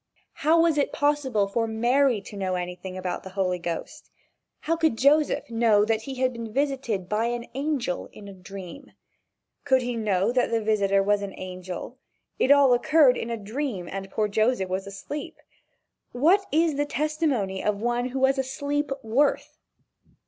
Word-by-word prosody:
How 320 +2 +4
was 330 -3 +3
it 285 - +1
possible 275 -8 +1
for 225 +3 -1
Mary 240 +1 +2
to 205 - -11
know 190 -2 -2
anything 180 +1 -5
about 185 -1 -3
the 190 - -9
Holy 180 -2 0
Ghost? 170 -1 -6 0.5
How 330 - 0
could 320 -8 +1
Joseph 290 +3 +3
know 225 -3 +3
that 220 0 0
he 265 +4 -7
had 255 0 0
been 230 -2 -7
visited 260 -8 -1
by 215 +3 0
an 240 0 -2
angel 275 - -2
in 205 - -12
a 200 - -9
dream? 190 +6 -10 0.7
Could 260 -3 +3
he 245 0 -2
know 210 -2 +1
that 250 0 +1
the 230 - +1
visitor 200 -2 +2
was 205 0 +2
an 200 -1 -6
angel? 185 +6 -7 0.4
It - - +2
all 280 -3 +6
occurred 285 +1 +4
in 230 - -4
a 230 - -2
dream 215 -3 -4
and 195 +1 -6
poor 210 +2 0
Joseph 215 -1 +1
was 190 +2 -3
asleep. 280 +9 -7 0.8
What 345 +11 +3
is 315 -1 +2
the 290 - +1
testimony 290 - -1
of 210 -1 0
one 240 +2 0
who 260 - -5
was 270 +1 +3
asleep 285 +2 -2
worth? 260 +7 0
235 Hz, 170 wpm, -25 LUFS, 200-280 Hz, 0.8 s, all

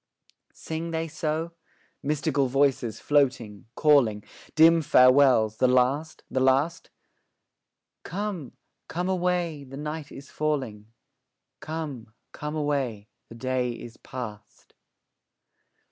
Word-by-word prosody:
Sing 165 +1 -5
they 165 0 -2
so? 160 +1 -3 0.5
Mystical 140 -2 0
voices, 130 -4 +1
floating, 130 -8 0
calling; 125 -9 +3 0.3
Dim 165 +1 +6
farewells 125 -5 +5
the 130 - +3
last, 130 +5 +1
the 130 - -1
last? 135 +5 +1 1.1
Come, 190 -6 -5 0.3
come 180 +2 -3
away, 175 -5 -1
the 135 0 -10
night 150 0 -5
is 140 +1 -11
falling; 130 -9 -2 0.7
'Come, 140 -8 -6 0.2
come 150 +1 -6
away, 135 -8 -2 0.2
the 115 - -11
day 125 0 -1
is 120 0 -10
past.' 105 -5 -9
140 Hz, 100 wpm, -26 LUFS, 125-155 Hz, 1.1 s, Dim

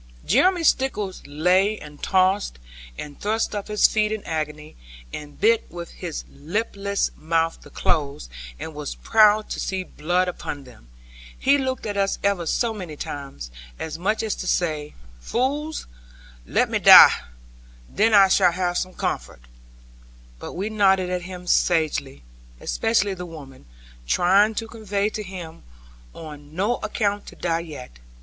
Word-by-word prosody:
Jeremy 365 -2 +3
Stickles 235 - 0
lay 180 +8 +2
and 150 -4 -12
tossed, 190 - +2 0.4
and 145 -1 -9
thrust 220 +2 0
up 205 -1 -4
his 210 -1 +4
feet 215 -1 0
in 215 -1 -3
agony, 155 -1 -4 0.4
and 145 -1 -8
bit 225 +3 +4
with 170 0 -8
his 170 -4 -6
lipless 200 +6 -2
mouth 165 +1 -1
the - - -14
clothes, 140 - -1 0.3
and 160 - -6
was 150 -1 -5
proud 215 -1 +4
to - - -3
see 190 -1 -2
blood 180 +2 -1
upon 145 -5 -5
them. 120 - -17 0.5
He 280 +1 +3
looked 260 -2 -2
at 205 -2 -3
us 195 0 +1
ever 200 -4 +1
so 235 +5 0
many 180 -7 -7
times, 140 - -7 0.3
as 160 0 -5
much 205 +6 0
as 220 - -1
to 185 - -5
say, 155 -5 -1 0.2
'Fools, 285 - -2 0.6
let - - +2
me - - -1
die, - - +11 0.8
then 215 +3 +2
I 195 -1 +8
shall 185 -2 +4
have 180 -1 0
some 185 0 -5
comfort'; - - -4 1.0
but - - -7
we 200 +5 -3
nodded 190 -3 +3
at 180 -1 -1
him 180 -1 -8
sagely, 155 - +1 0.4
especially 215 -3 +1
the 180 -1 -7
women, 135 - -12 0.4
trying 195 - +4
to 225 - -3
convey 210 -3 -2
to 215 - -5
him, 180 -5 -8 0.5
on 150 -1 -10
no 205 +7 +1
account 205 -1 -2
to - - -10
die 165 -1 -1
yet. 145 - -9
185 Hz, 150 wpm, -23 LUFS, 155-210 Hz, 1.0 s, die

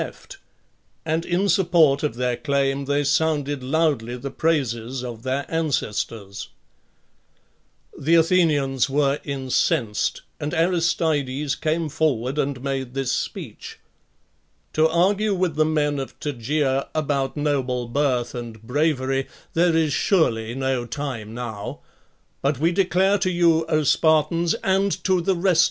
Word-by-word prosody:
Jeft, 395 - -8 0.7
and. 160 +1 0
in. 180 +3 +1
support 170 -6 +4
of 150 -7 -1
their.claim 135 +2 0
they 145 +1 +1
sounded 145 -1 0
loudly 130 -4 0
the 135 +2 -6
praises 130 -5 -1
of 120 -3 -6
their 130 +3 -2
ancestors, 115 -10 -3 1.5
The 160 +4 +2
Athenians 150 -7 +3
were 140 +1 +1
incensed, 130 -4 0 0.2
and 150 -1 -3
Aristides 160 -5 +1
came 160 +3 -1
forward 140 -3 0
and 135 -3 -2
made 135 -2 -3
this 135 -2 -1
speech: - - -5 0.5
" 75 0 -43
To 155 +1 +4
argue 195 +5 +2
with 180 -3 0
the 155 0 +3
men 150 -2 0
of 135 - -7
Tegea 140 0 -1
about 140 -3 -1
noble 130 -4 -1
birth 125 -2 0
and 120 -2 -7
| - - -26
bravery, 135 0 0 0.3
there 170 0 +3
is 155 -3 +1
'surely 120 - +1
no 130 -2 -1
time 120 -6 -5
now; 115 -4 -6 0.6
but 140 +1 +1
we 165 +4 +2
declare 190 +2 +2
to 190 -1 +1
you, 170 -2 +3
O 155 -1 +1
Spartans, 160 +3 +2
and. 195 +1 +2
to 185 -2 +2
the 190 +2 +1
rest. 175 -1 +2
145 Hz, 135 wpm, -23 LUFS, 130-165 Hz, 1.5 s, support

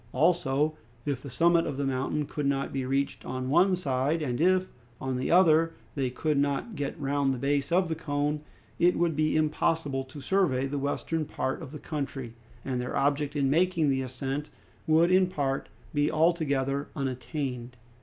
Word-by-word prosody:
Also, 155 -3 +2 0.3
if 140 -3 -2
the 140 - -8
summit 170 +6 +3
of 135 - -3
the 140 - -1
mountain 135 +3 -1
could 145 0 -3
not 140 0 -1
be 135 -2 -2
reached 135 +1 -1
on 130 0 -3
one 185 +5 +5
side, 145 -1 0
and 125 0 -2
if, 185 +1 +3 0.3
on 130 -1 -2
the 125 - -2
other, 165 -2 +5 0.2
they 135 -3 -1
could 145 +3 0
not 140 +10 0
get 145 -1 -4
round 140 -1 +1
the 130 - -2
base 140 +4 0
of 180 +1 +3
the 165 - -1
cone, 150 -1 -1 0.4
it 175 +1 +4
would 170 -2 +1
be 155 +1 +1
impossible 150 -2 0
to 130 +2 -11
survey 140 -4 +1
the 140 +1 -2
western 155 +3 -1
part 135 -2 -3
of - - -7
the 150 - -8
country, 140 -6 -5 0.3
and 125 -2 -1
their 125 - -3
object 145 +1 +1
in 140 -2 +2
making 165 +1 +2
the 135 0 +1
ascent 135 +3 -4 0.4
would 165 +3 +4
in 185 0 +5
part 140 -6 -2 0.2
be 145 0 +2
altogether 145 -4 +1
unattained. 125 -2 -4
145 Hz, 180 wpm, -28 LUFS, 135-160 Hz, 0.4 s, one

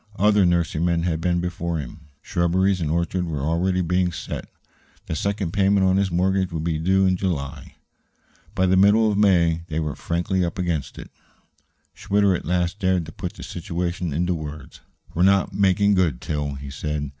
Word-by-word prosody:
Other 105 -1 +4
nurserymen 85 0 +1
had 80 -2 -1
been 85 0 +1
before 85 -1 -3
him; 75 +1 -7 0.2
shrubberies 90 +2 +1
and 80 - -1
orchards 85 +2 -1
were 75 -4 -3
already 90 +4 +1
being 90 +1 +1
set - - -6
out. - - -31 0.6
The - - -4
second 100 0 -2
payment 100 0 +3
on 95 0 +3
his 100 -1 +1
mortgage 95 +1 +1
would 80 -2 -3
be 80 -2 -1
due 95 +4 +2
in 95 -1 +2
July. 75 -7 -4 0.8
By 95 -1 +2
the 95 0 +3
middle 105 +3 +5
of - - -1
May 85 -5 +3
they 80 0 -2
were 75 -4 -3
frankly 90 +2 -1
up 85 -1 -3
against 85 -6 -2
it. - - -10 0.8
Schwitter 100 -1 +1
at - - -5
last 90 +3 -1
dared 95 -3 +1
to 80 - -9
put - - -6
the - - -10
situation 85 0 -3
into 90 +5 0
words. 75 -3 -8 0.3
"We're 85 - -1
not 95 +1 +3
making 100 +1 +3
good, 85 -10 +1
Til," 75 -1 -3
he 70 0 -8
said. 75 0 -3
90 Hz, 185 wpm, -23 LUFS, 80-95 Hz, 0.8 s, middle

